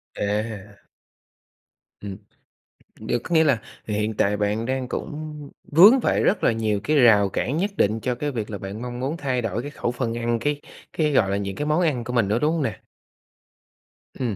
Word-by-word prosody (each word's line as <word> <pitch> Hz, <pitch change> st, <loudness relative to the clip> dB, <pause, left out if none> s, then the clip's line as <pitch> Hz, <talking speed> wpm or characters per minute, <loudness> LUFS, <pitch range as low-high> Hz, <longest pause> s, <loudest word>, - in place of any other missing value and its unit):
À. 105 Hz, 0 st, -3 dB, 1.2 s
Ừm. 100 Hz, -2 st, -6 dB, 0.8 s
Được, 110 Hz, +2 st, -1 dB
có 175 Hz, -, -2 dB
nghĩa 160 Hz, -, +6 dB
là 135 Hz, -8 st, +2 dB, 0.3 s
hiện 105 Hz, +1 st, -1 dB
tại 105 Hz, +1 st, +2 dB
bạn 105 Hz, +2 st, -1 dB
đang 130 Hz, 0 st, -2 dB
cũng 150 Hz, 0 st, -6 dB, 0.2 s
vướng 205 Hz, -, +8 dB
phải -, -, +1 dB
rất 205 Hz, -, +2 dB
là -, -, +4 dB
nhiều 110 Hz, -2 st, 0 dB
cái 150 Hz, +4 st, +2 dB
rào 110 Hz, -6 st, +6 dB
cản 130 Hz, +9 st, -2 dB
nhất 200 Hz, +4 st, 0 dB
định 110 Hz, +2 st, +2 dB
cho 125 Hz, +2 st, -2 dB
cái 145 Hz, +3 st, -3 dB
việc 110 Hz, -4 st, -4 dB
là 105 Hz, -, -4 dB
bạn 100 Hz, +3 st, -7 dB
mong 125 Hz, 0 st, -5 dB
muốn 140 Hz, +6 st, -2 dB
thay 130 Hz, -4 st, -1 dB
đổi 115 Hz, 0 st, -2 dB
cái 145 Hz, -, -7 dB
khẩu 120 Hz, -, -2 dB
phần 120 Hz, -2 st, -3 dB
ăn, 120 Hz, 0 st, 0 dB
cái 145 Hz, +4 st, -1 dB, 0.3 s
cái, 155 Hz, -2 st, +1 dB
gọi 100 Hz, -8 st, +3 dB
là, 100 Hz, -, +1 dB
những 100 Hz, -1 st, -4 dB
cái 150 Hz, -, -3 dB
món 155 Hz, +4 st, +2 dB
ăn 145 Hz, -8 st, +1 dB
của 125 Hz, -, -5 dB
mình 120 Hz, -5 st, +2 dB
nữa, 105 Hz, +4 st, +1 dB
đúng 150 Hz, +3 st, +2 dB
hông 165 Hz, -, -1 dB
nè? -, -, -3 dB, 1.3 s
Ừm, 120 Hz, -5 st, -2 dB
120 Hz, 205 wpm, -23 LUFS, 105-145 Hz, 1.3 s, vướng